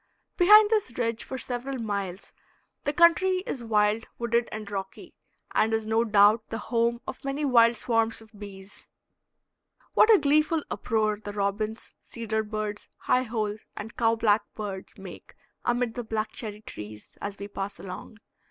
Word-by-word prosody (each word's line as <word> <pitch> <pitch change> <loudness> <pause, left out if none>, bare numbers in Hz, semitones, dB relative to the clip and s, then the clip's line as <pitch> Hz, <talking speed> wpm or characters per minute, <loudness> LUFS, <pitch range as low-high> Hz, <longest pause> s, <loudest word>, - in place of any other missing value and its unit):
Behind 420 +4 +7
this 415 - 0
ridge 230 -2 -1
for 265 - -6
several 255 +2 -4
miles 200 -5 -4 0.5
the 290 - +2
country 355 +4 +4
is 250 - -4
wild, 215 0 +1
wooded, 235 0 0
and 215 0 -5
rocky, 195 -1 -6 0.4
and 220 +1 +2
is 220 -1 -2
no 220 +1 +2
doubt 215 0 +5
the 225 - -3
home 235 +2 0
of - - -7
many 275 +2 -2
wild 235 -3 +5
swarms 225 0 +1
of 220 -1 -15
bees. 200 -1 -12 1.1
What 450 - +6
a 430 - +8
gleeful 305 +1 +2
uproar 215 -2 0
the 205 0 -6
robins, 210 +2 -2
cedar 220 -2 -3
birds, 210 -1 -5
high 250 - +2
holes, 220 -3 -3 0.2
and 220 +2 -7
cow 225 -1 +2
black 220 -2 +3
birds 200 -3 -6
make - - -11 0.3
amid 240 -1 0
the 245 - -4
black 220 -1 -2
cherry 210 -2 -6
trees 105 - -10
as 200 -1 -5
we 200 - -6
pass 200 0 -5
along. 190 +3 -9
225 Hz, 160 wpm, -27 LUFS, 210-245 Hz, 1.1 s, a